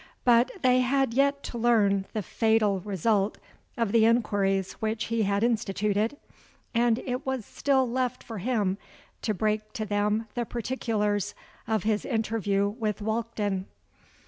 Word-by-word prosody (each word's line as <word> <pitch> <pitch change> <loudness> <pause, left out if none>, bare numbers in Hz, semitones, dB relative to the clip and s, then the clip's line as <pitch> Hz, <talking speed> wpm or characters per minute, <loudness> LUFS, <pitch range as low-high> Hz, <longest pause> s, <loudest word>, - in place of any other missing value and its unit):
But 240 +1 +5
they 255 0 +5
had 265 -1 +2
yet 280 +2 +2
to 235 - -5
learn 205 -5 +3
the 215 -2 -2
fatal 220 -2 +2
result 200 +2 0 0.4
of 230 -4 0
the 225 0 +5
enquiries 200 -5 +2
which 220 0 -1
he 230 - +2
had 200 0 +1
instituted; 215 +1 0 0.6
and 235 -1 +3
it 255 +1 -2
was 265 -5 -3
still 265 -2 +1
left 250 +1 -2
for 225 -3 -7
him 205 -3 0 0.4
to 215 - -1
break 215 +2 -1
to 215 - -3
them 210 +2 0
the 240 - -1
particulars 210 -4 -1 0.3
of 220 -4 0
his 215 -1 +1
interview 215 -4 0
with 210 -1 -2
Walkden. 215 -3 -2
220 Hz, 145 wpm, -27 LUFS, 205-240 Hz, 0.6 s, But